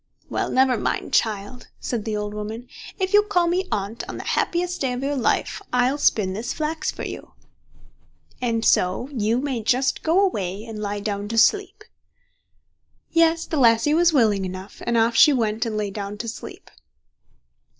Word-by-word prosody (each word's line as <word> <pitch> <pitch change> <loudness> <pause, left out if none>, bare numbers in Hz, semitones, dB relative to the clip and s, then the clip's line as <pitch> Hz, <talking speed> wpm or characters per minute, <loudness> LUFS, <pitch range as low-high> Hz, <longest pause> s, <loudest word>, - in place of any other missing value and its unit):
"Well, - - -1
never 260 -3 +3
mind, - - -2
child", 220 +3 -1
said 230 -4 -3
the 215 -1 -2
old 210 0 -4
woman. 215 +3 -6 0.3
"If 375 0 -2
you'll 415 0 +6
call 360 -4 +2
me 360 +2 0
Aunt 205 +3 -3
on - - -5
the - - -6
happiest 355 +1 -1
day 260 -2 0
of 250 +2 -4
your 285 +1 -1
life, 255 - 0
I'll 250 +3 +2
spin 195 -8 +2
this 220 +5 -3
flax 310 +1 -2
for - - -5
you, - - -7 1.1
and 230 -2 0
so 185 +8 +2
you 225 -3 0
may 265 -4 -2
just 255 +5 +1
go 330 +4 +2
away 205 - -1
and 225 -2 -7
lie 205 0 -3
down 205 0 -3
to 225 +2 -4
sleep." 405 - +2 1.3
Yes, 330 0 +3
the 315 - -3
lassie 235 +2 +4
was 340 +1 +4
willing 220 -9 +3
enough, 185 +1 -7
and 235 0 +2
off 230 +1 +2
she 295 +5 +7
went 225 -1 0
and 215 -1 -3
lay 205 -2 -2
down 200 0 -5
to 230 - -5
sleep. 225 - -9
235 Hz, 180 wpm, -23 LUFS, 210-300 Hz, 1.3 s, she